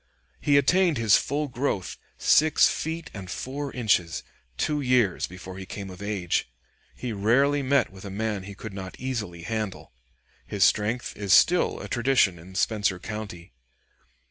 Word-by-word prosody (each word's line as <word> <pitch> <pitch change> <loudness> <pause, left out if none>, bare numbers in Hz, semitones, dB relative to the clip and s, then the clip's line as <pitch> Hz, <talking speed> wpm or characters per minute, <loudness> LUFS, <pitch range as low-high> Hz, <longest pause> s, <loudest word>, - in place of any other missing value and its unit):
He 145 -1 +3
attained 170 +3 +3
his 115 -3 +5
full 145 +2 0
growth, 125 -7 -2 0.2
six 155 0 +5
feet 160 +1 -4
and 95 -3 -8
four 140 +6 -4
inches, 100 -9 +1 0.3
two 150 - 0
years 125 -8 +2
before 90 +1 -9
he 95 - -8
came 100 -2 -7
of 90 +1 -11
age. 100 -9 -1 0.5
He 125 -3 -4
rarely 135 +8 +3
met 140 -2 +2
with 95 -1 -13
a 100 - -6
man 105 0 -2
he 100 +1 -9
could 110 +1 -8
not 95 -1 -8
easily 105 -10 -4
handle. 110 - -4 0.5
His - - +1
strength 110 +4 +1
is 100 -2 +1
still 180 +1 +4
a - - -7
tradition 120 -8 +2
in 90 +3 -13
Spencer 105 -3 +1
County. 90 - -7
110 Hz, 155 wpm, -26 LUFS, 95-135 Hz, 0.5 s, his